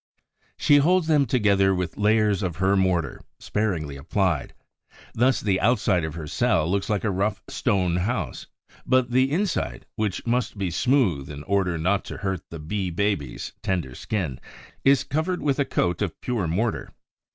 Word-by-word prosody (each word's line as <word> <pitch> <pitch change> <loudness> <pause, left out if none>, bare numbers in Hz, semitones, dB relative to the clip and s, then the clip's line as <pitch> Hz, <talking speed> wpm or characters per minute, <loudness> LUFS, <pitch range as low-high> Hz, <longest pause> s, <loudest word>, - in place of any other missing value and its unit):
She 145 - +5
holds 175 +4 +3
them 150 -4 +3
together 100 -5 +3
with 90 -2 -3
layers 105 -1 +2
of 90 -5 -2
her 95 +1 +2
mortar, 90 -7 0 0.2
sparingly 85 -10 -2
applied. 85 +1 -1 0.6
Thus 125 +3 +2
the 95 -3 0
outside 105 -6 +2
of 80 -1 -4
her 80 -2 -6
cell 75 +1 +1
looks 100 +2 -1
like 105 -2 0
a 110 - +1
rough 100 +2 -1
stone 90 -3 0
house; 105 +8 -2 0.4
but 130 -1 +2
the 130 +2 +3
inside, 165 - -1
which 105 -4 -2
must 120 -2 0
be 95 -3 -2
smooth 95 - +1
in 75 0 -7
order 90 -1 0
not 95 +5 +1
to - - -7
hurt 95 -4 -2
the 85 - -7
Bee 90 +5 -3
baby's 90 -7 -2
tender 85 -9 -2
skin, 85 - -3 0.4
is 135 0 +4
covered 160 +6 -2
with 140 -2 +1
a 140 - +3
coat 85 -6 0
of 95 -6 -2
pure 115 -8 -2
mortar. 105 +8 -1
100 Hz, 165 wpm, -24 LUFS, 85-120 Hz, 0.6 s, She